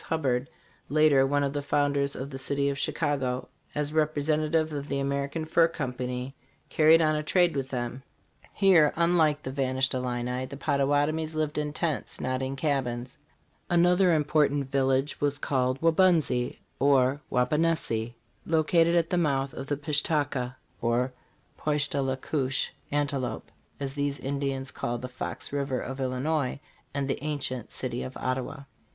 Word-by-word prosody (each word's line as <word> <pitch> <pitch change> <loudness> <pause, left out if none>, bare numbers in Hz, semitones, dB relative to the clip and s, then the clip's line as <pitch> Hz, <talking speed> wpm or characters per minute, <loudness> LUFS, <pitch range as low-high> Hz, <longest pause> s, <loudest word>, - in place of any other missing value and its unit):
Hubbard, 135 -5 -1 0.4
later 145 -3 +5
one 145 +1 +1
of 140 0 -1
the 145 - -1
founders 140 -1 +1
of 135 +2 -6
the 135 - -6
city 140 +1 0
of 140 -1 -3
Chicago, 135 -6 -1 0.3
as 150 0 -1
representa 155 0 +1
tive 160 -1 +1
of 145 -1 -4
the 140 - -1
American 140 +3 -2
Fur 165 +1 +4
Company, 125 -4 -4 0.4
carried 160 +1 +5
on 155 0 +3
a 150 - 0
trade 175 +2 +2
with 135 -1 -2
them. 125 0 -4 0.5
Here, 180 -7 +5
unlike 165 -3 +3
the 130 - -4
vanished 130 -1 0
Illini, 125 0 -2
the 140 - -8
Pottawatomies 145 +3 +1
lived 155 -1 -1
in 150 0 -2
tents, 155 -2 -2
not 130 0 -1
in 130 +1 -2
cabins. 130 -4 -2 0.5
Another 175 +1 +4
important 145 -2 +1
village 135 +1 +1
was 145 0 +1
called 130 -2 0
Waubunsee 165 -7 +3 0.2
(or 135 0 +3
Wauponehsee), 125 -4 +1 0.3
located 165 +1 +3
at 165 -1 +2
the 180 - +2
mouth 135 -4 0
of 135 - -6
the 145 - -1
Pish 150 0 0
ta 150 -2 +2
ka 130 -2 -4 0.3
(or 120 +2 +1 0.5
Poish 150 -1 +1
tah 140 - -1
le 135 -1 -1
koosh: 135 -1 -1 0.2
antelope), 140 -5 -2 0.3
as 135 -1 -3
these 145 -1 -1
Ind 140 +1 -3
ians 135 -1 -2
called 120 0 -3
the - - -2
Fox 130 +2 -5
river 140 -3 -1
of 135 +2 -5
Illinois, 130 +2 -1 0.3
and 140 -1 -2
the 140 - -3
ancient 140 -5 -3
city - - -4
of 65 - -6
Ottawa. 130 +2 -3
140 Hz, 160 wpm, -28 LUFS, 130-155 Hz, 0.5 s, later